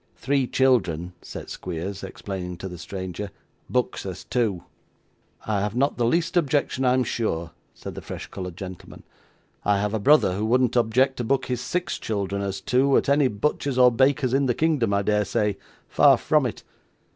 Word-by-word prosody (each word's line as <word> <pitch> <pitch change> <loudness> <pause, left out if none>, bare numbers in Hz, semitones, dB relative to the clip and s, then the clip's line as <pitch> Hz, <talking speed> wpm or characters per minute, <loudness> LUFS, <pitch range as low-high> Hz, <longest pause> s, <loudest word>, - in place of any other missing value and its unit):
Three 135 0 0
children,' 95 -12 +1
said - - -8
Squeers, 95 +3 -5
explaining 95 -2 -6
to 95 - -6
the 90 -2 -8
stranger, 95 +2 -5 0.4
'books - - -1
as - - -6
two.' 105 -8 -1 0.8
'I 105 -2 0
have 105 +2 -2
not 140 +3 +1
the 120 -2 +2
least 165 +7 +1
objection 145 -4 +1
I 125 0 +4
am 130 - +2
sure,' 85 -8 -2 0.2
said - - -8
the - - -7
fresh - - -7
coloured 90 -3 -7
gentleman; 95 -2 -9 0.6
'I 105 -1 +2
have 105 +1 -1
a 110 - 0
brother 140 -4 +4
who 105 +3 -1
wouldn't 125 +1 +2
object 125 +3 +2
to 120 - -2
book 135 +4 +1
his 125 -1 -2
six 175 +5 -2
children 100 -2 -2
as 100 -1 -3
two 135 +6 +3
at - - +1
any 140 -1 +4
butcher's 130 +4 -1
or 125 -1 +7
baker's 130 +1 +2
in 135 0 +2
the 125 - +1
kingdom, 150 -9 +1
I 100 0 +1
dare 105 +1 +2
say. 100 0 -1 0.3
Far - - +5
from - - +2
it. - - -7
110 Hz, 185 wpm, -24 LUFS, 95-130 Hz, 0.8 s, or